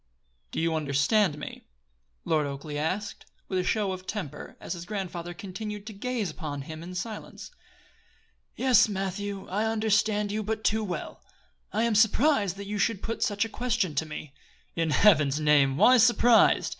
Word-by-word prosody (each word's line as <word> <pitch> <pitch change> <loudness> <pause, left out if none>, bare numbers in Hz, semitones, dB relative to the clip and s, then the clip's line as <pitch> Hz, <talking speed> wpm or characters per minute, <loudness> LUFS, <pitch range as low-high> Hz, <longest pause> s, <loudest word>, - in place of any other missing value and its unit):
"Did - - -2
you 165 0 +1
understand 150 +4 +2
me?" 150 - -9 0.6
Lord 155 -2 +1
Oakleigh 140 +2 -6
asked, 195 +7 -3 0.2
with 185 - -1
a - - 0
show 205 +1 0
of 185 0 -7
temper, 195 -10 -6
as - - -5
his 170 -2 -7
grandfather 175 -4 -5
continued 205 +2 -6
to 215 - -7
gaze 225 -1 -3
upon 145 -5 -6
him 155 +2 -8
in 180 +2 -8
silence. 215 - -6 1.0
"Yes, 255 -4 +4
Matthew, 195 0 -4
I 210 +4 -1
understood 215 -1 +1
you 215 +1 -1
but 220 +1 -3
too 220 +1 +1
well. 185 -4 -5 0.5
I 220 - 0
am 235 -1 +1
surprised 220 - +3
that 200 - -7
you 205 +1 -4
should 215 -1 0
put 230 - -4
such 205 +1 +1
a - - -4
question 225 -6 -1
to 155 +2 -1
me." 150 -2 -8 0.4
"In 165 -1 0
Heaven's 150 -5 +4
name! 145 -3 +3
why 255 +9 +6
surprised? 235 0 +5
200 Hz, 170 wpm, -27 LUFS, 160-215 Hz, 1.0 s, why